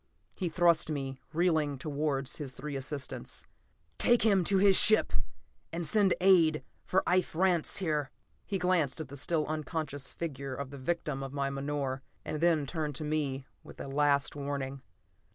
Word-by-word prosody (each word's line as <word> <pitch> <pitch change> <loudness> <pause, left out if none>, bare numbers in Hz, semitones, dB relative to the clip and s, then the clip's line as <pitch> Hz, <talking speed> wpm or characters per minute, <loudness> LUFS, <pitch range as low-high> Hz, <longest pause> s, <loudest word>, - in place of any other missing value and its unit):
He 180 -3 -3
thrust 170 -1 +2
me, 135 -3 -4
reeling, 155 -4 +1
towards 140 -1 -2
his 140 -3 -5
three 145 +1 -6
assistants. 135 +1 -6 0.5
"Take 240 0 +4
him 200 -4 +3
to 195 - +3
his 195 0 +5
ship, 215 +3 +8 0.6
and 170 0 -4
send 200 0 +3
aid 170 -5 +4 0.2
for 190 - +1
Ife 180 -2 +1
Rance, 175 -2 +2
here." 150 -7 -1 0.4
He 200 - -1
glanced 180 -6 0
at 155 - -6
the 140 - -9
still 155 +2 0
unconscious 155 -2 -4
figure 140 -5 -5
of 140 0 -6
the 140 - -9
victim 150 -1 -3
of 135 0 -6
my 140 -1 -2
menore, 140 -1 -3 0.2
and 155 - -4
then 165 -4 +2
turned 150 0 -4
to 155 - -4
me 145 -3 -2 0.2
with - - -14
a - - -6
last 140 0 +1
warning. 140 -1 -4
150 Hz, 165 wpm, -30 LUFS, 140-170 Hz, 0.6 s, ship